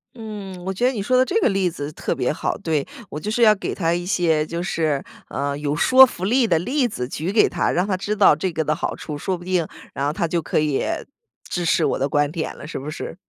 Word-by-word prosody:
嗯， 205 -5 -8
我 190 - -2
觉 215 +6 -1
得 255 - +4
你 220 - -3
说 255 +5 +2
的 255 - +5
这 395 +11 +1
个 - - +4
例 195 -2 +1
子 145 -2 -5
特 - - -2
别 - - 0
好， - - -2
对。 155 -3 -1 0.2
我 150 - -5
就 210 +6 -4
是 235 - 0
要 215 -2 +7
给 - - -4
他 165 -3 0
一 175 0 -2
些 165 -5 +2
就 170 +2 -4
是， 160 -6 -1 0.3
呃， 140 +1 -2
有 145 0 -2
说 260 - +8
服 185 -6 -5
力 245 +4 +3
的 165 -4 +3
例 255 - +1
子 125 - -4
举 160 +7 -3
给 215 - +4
他， - - 0
让 180 +3 +1
他 185 -2 0
知 205 +3 -2
道 200 -7 +6
这 180 +4 -2
个 160 -1 -1
的 155 0 0
好 - - -3
处。 155 - -7
说 185 +5 -2
不 175 - -12
定， 180 -2 0 0.3
然 140 - -2
后 145 - +1
他 175 -2 -1
就 170 +1 0
可 155 - 0
以 150 -3 0 0.7
支 175 - -2
持 - - +3
我 - - +1
的 135 - +1
观 145 +1 +1
点 160 -2 -4
了， - - -9
是 - - -5
不 140 - -6
是？ 165 - -6
175 Hz, 290 characters per minute, -22 LUFS, 155-205 Hz, 0.7 s, 说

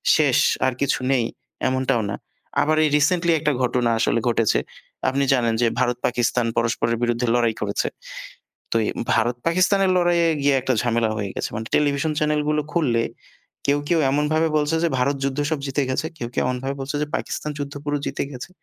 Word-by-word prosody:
শেষ - - +3 0.3
আর 130 - 0
কিছু 140 -1 +1
নেই 125 -4 +2 0.4
এমনটাও 130 -2 +1
না। 100 - -2 0.5
আবার 155 +1 +2
এই 150 - +2
রিসেন্টলি 170 +4 +2
একটা 150 -1 +1
ঘটনা 125 -1 +1
আসলে 115 - +2
ঘটেছে। 115 -2 +2 0.5
আপনি 140 +1 0
জানেন 120 -3 +2
যে 120 - +4
ভারত-পাকিস্তান 125 -1 0
পরস্পরের 115 0 +1
বিরুদ্ধে 120 0 0
লড়াই 120 -2 +2
করেছে। 100 -1 -1 0.8
তো - - -1
এ - - 0 0.2
ভারত-পাকিস্তানের 165 - +2
লড়াইয়ে 175 -1 +3
গিয়ে 140 0 +3
একটা 130 +1 0
ঝামেলা 115 -2 +1
হয়ে 100 -2 -3
গেছে। - - -2
মানে 110 +1 -4
টেলিভিশন 145 +1 +1
চ্যানেলগুলো 150 0 +1
খুললে 125 -9 +1 0.6
কেউ, 140 +1 +2
কেউ 170 - +3
এমনভাবে 150 +3 +2
বলছে 150 +2 +1
যে 170 - +3
ভারত 140 +3 +1
যুদ্ধ 135 +1 -2
সব 155 - 0
জিতে 135 +2 0
গেছে। 130 - -1
কেউ, 120 - -4
কেউ - - +2
এমনভাবে 130 +2 -2
বলছে 135 +2 -4
যে - - -4
পাকিস্তান 150 - -4
যুদ্ধ 140 0 -4
পুরো 145 0 0
জিতে 140 - -2
গেছে। 125 +5 -8
135 Hz, 175 wpm, -22 LUFS, 120-150 Hz, 0.8 s, যে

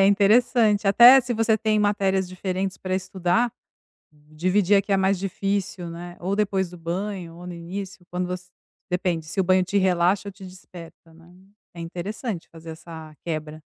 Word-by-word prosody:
É, 195 - +6
interessante, 210 +1 +3
até 240 +6 +9
se 245 -1 -3
você 220 0 +2
tem 215 0 +1
matérias 195 -2 +1
diferentes 185 +1 -3
pra 185 0 -3
estudar, 185 +4 0 0.8
dividir 185 +5 +2
a 195 - +3
que 200 +1 -3
é - - +4
mais 190 0 +2
difícil, 195 -2 -3
né. 175 +1 -8
Ou 190 +3 -2
depois 195 -3 0
do 180 - -11
banho 175 0 -4
ou 175 +1 -11
no 180 - -6
início, 180 +2 -7
quando 180 0 -2
você 180 0 -6 0.4
depende, 180 -2 -1
se 190 +4 -2
o - - +2
banho 185 +1 +4
te 200 +2 0
relaxa 185 +1 +2
ou - - -7
te 190 0 -13
desperta, 175 -3 -13
né? 170 +1 -18 0.4
É 170 - -9
interessante 180 +3 -5
fazer 165 0 -11
essa 160 -1 -10
quebra. 155 -1 -5
185 Hz, 180 wpm, -24 LUFS, 175-200 Hz, 0.8 s, até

